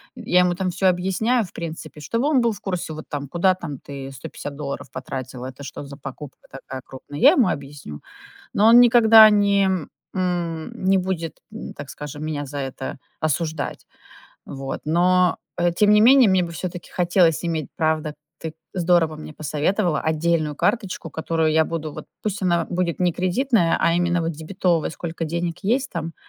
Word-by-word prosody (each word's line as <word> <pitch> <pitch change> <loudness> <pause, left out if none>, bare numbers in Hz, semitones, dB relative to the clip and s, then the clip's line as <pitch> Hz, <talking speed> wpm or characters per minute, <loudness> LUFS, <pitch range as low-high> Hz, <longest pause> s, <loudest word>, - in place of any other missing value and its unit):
я 220 -7 +2
ему 180 -1 +3
там 185 0 -1
всё 190 +2 +1
объясняю, 190 +7 +1
в 180 - -15
принципе, 160 -2 -7
чтобы 230 - -1
он 285 -4 +3
был 235 -1 +2
в 210 - -8
курсе, 180 -4 -3
вот 155 0 -8
там: 145 -2 -4
"Куда 175 +6 +2
там, 145 -7 -7
ты 135 -1 -8
150 140 +2 -8
долларов 140 -4 -6
потратила? 130 -1 -6
Это 130 +2 -10
что 140 - -7
за 140 0 -10
покупка 135 0 -10
такая 135 0 -8
крупная?" 140 +2 -9
Я 270 +6 +8
ему 270 - +3
объясню. 140 - -6 0.5
Но 210 - +4
он 235 +1 +9
никогда 225 -2 +8
не 200 -1 +3 0.5
м, 175 -3 -2
не 190 +1 +4
будет 180 -3 -2
м, 220 - -8
так 145 -1 -9
скажем, 150 +1 -7
меня 145 -2 -3
за 145 +1 -6
это 135 0 -5 0.2
осуждать. 155 -1 -2 0.6
Вот. 135 -1 -5
Но, 180 +3 +3 0.2
э, 175 0 +2
тем 205 +4 +3
не 210 0 +6
менее, 250 0 +7
мне 190 -1 +3
бы 170 - -5
всё-таки 175 +1 -6
хотелось 175 -2 +2
иметь, 160 -4 -2
правда, 155 -1 0 0.2
ты 160 -1 -6 0.2
здорово 175 -3 +2
мне 155 0 -9
посоветовала 155 +3 0
отдельную 160 -1 0
карточку, 195 - -1
которую 160 +1 0
я 160 0 +3
буду 160 -2 -4
вот - - -9 0.2
пусть 210 -2 -3
она 170 -2 +2
будет 175 -1 -1
не 180 -1 +2
кредитная, 185 - +1
а 165 - +3
именно 175 0 +1
вот 165 0 -1
дебетовая 165 +1 -1
сколько 165 0 -5
денег 170 +1 -3
есть 255 +7 +1
там, 165 -1 -4
170 Hz, 180 wpm, -22 LUFS, 150-185 Hz, 0.6 s, он